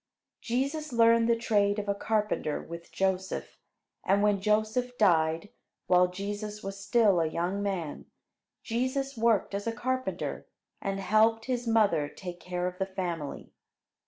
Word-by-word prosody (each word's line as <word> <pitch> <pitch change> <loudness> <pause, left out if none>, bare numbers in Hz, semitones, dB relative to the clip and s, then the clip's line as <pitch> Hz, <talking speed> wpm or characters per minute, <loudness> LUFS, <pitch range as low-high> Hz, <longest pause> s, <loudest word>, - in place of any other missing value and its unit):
Jesus 280 +5 -2
learned 230 0 +4
the 235 - +5
trade 205 -3 +2
of 210 -1 -3
a 200 - +2
carpenter 210 -7 -1
with 170 0 -9
Joseph; 190 0 -2 0.4
and 200 +1 +2
when 205 -2 +2
Joseph 220 +4 0
died, 165 -2 +3 0.4
while 180 0 +5
Jesus 205 +3 -5
was 195 0 -5
still 200 -3 +4
a 160 - +1
young 175 +5 -2
man, 190 -7 -3 0.6
Jesus 260 +4 -1
worked 225 -3 +2
as 205 +2 -3
a - - +1
carpenter, 255 +3 -3 0.3
and 195 0 -2
helped 220 +3 +3
his 245 -2 -2
mother 210 -10 +3
take 175 +2 -8
care 180 0 -3
of 180 +1 -4
the 190 - 0
family. 175 -6 -4
205 Hz, 145 wpm, -29 LUFS, 185-230 Hz, 0.6 s, the